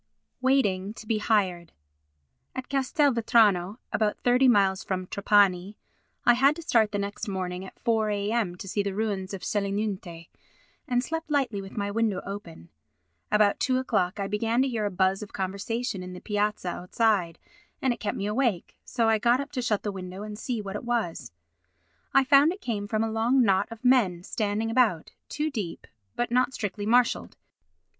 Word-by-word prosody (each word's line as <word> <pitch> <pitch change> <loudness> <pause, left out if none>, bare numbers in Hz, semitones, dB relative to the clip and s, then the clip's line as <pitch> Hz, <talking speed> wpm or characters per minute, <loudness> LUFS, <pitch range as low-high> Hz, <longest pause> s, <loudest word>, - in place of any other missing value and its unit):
Waiting 210 -7 +1
to 220 - -10
be 215 0 0
Hired 185 -6 0 0.8
At 260 -1 -6
Castelvetrano 235 - +2 0.2
(about 215 -1 +1
thirty 250 +2 +4
miles 195 -5 +3
from 185 -1 -3
Trapani) 200 0 +2 0.5
I 240 - +7
had 275 +4 +4
to 335 - -8
start 225 -9 +3
the 205 - -1
next 200 +3 -4
morning 185 -2 -3
at 190 - -11
4 220 -2 +1
a.m. 205 -2 -1
to 185 - -9
see 205 +2 0
the 200 -1 -3
ruins 205 -3 -2
of 195 -2 -6
Selinunte, 200 -5 -3 0.6
and 245 -2 +1
slept 325 +2 -4
lightly 260 -9 0
with 195 +2 -11
my 200 -1 -1
window 215 -3 0
open. 180 - -8 0.6
About 210 -1 +3
two 255 -1 +1
o'clock 205 -7 0
I 200 - -1
began 225 +5 +1
to - - 0
hear 225 -5 -2
a - - 0
buzz 190 +1 +1
of 210 - -9
conversation 200 +3 -3
in 180 0 -7
the 180 - -8
piazza 210 -2 -1
outside 180 -1 0 0.4
and 260 -2 +1
it - - -11
kept 205 - -3
me 200 - -3
awake, 210 -4 -1
so 230 -2 0
I 220 -1 +3
got 240 +3 +3
up 280 +1 -5
to 265 -3 -2
shut 215 -4 0
the 205 - -2
window 185 0 -7
and 210 0 -6
see 225 0 -4
what 195 0 -6
it - - -5
was. 195 - -2 0.8
I 270 - +5
found 280 +3 +5
it 375 - -7
came 210 - -3
from 215 +1 0
a 225 - -2
long 235 +4 +3
knot 195 -2 +2
of 230 +2 -11
men 205 -9 +3
standing 215 +2 -2
about, 225 -9 +2 0.2
two 305 +1 -2
deep, 205 -10 -5 0.3
but 240 -1 -2
not 250 +1 +2
strictly 205 0 -4
marshalled. 245 +1 +2
210 Hz, 180 wpm, -27 LUFS, 195-240 Hz, 0.8 s, I